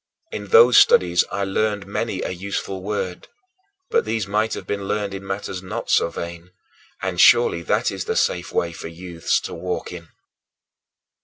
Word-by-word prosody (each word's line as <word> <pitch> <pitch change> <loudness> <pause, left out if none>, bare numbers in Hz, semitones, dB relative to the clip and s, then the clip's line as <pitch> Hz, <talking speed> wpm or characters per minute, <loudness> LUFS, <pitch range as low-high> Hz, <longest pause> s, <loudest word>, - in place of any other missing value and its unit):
In 105 -1 -6
those 115 +4 +7
studies 85 -1 +5
I 100 - -2
learned 105 +1 -1
many 100 0 -3
a - - -3
useful 95 +1 -4
word, 95 -2 -4 0.6
but 465 0 +3
these 110 -3 -2
might 105 +2 0
have - - -7
been 100 -1 -3
learned 105 -1 -2
in 95 0 -6
matters 95 -1 -4
not 95 - -5
so - - +3
vain; 85 +1 -7 0.5
and 95 -2 0
surely 120 -8 +5
that - - 0
is - - -5
the - - -2
safe 90 0 0
way 85 - 0
for 85 - -8
youths 85 -2 -2
to - - -7
walk 90 +2 -4
in. 85 -2 -9
95 Hz, 170 wpm, -22 LUFS, 85-105 Hz, 0.6 s, those